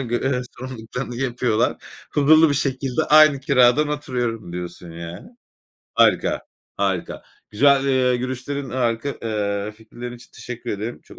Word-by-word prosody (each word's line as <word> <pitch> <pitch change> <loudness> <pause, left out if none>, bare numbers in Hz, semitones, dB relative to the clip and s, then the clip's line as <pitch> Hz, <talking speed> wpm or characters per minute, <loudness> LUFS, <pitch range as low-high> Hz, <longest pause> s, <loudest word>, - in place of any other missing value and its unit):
görev 125 +2 -1
ve 125 - 0 0.2
sorumluluklarını 125 0 -6
yapıyorlar. 120 -3 0 0.4
Huzurlu 155 +2 +6
bir 140 - +1
şekilde 135 +1 -1
aynı 155 -2 +7
kiradan 135 +1 +4
oturuyorum 120 -9 -3
diyorsun 90 -1 -7
yani. 85 - -8 0.7
Harika. - - +3 0.4
Harika. - - -2 0.3
Güzel, 140 -1 +4
eee, 130 -2 +2
görüşlerin, 130 +2 -4
harika, 120 +1 -1
eee, 105 -2 -2
fikirlerin 120 +3 -9
için 120 - -17
teşekkür 120 0 -7
ederim. 110 +4 -4
Çok - - -16
125 Hz, 130 wpm, -22 LUFS, 115-135 Hz, 0.7 s, aynı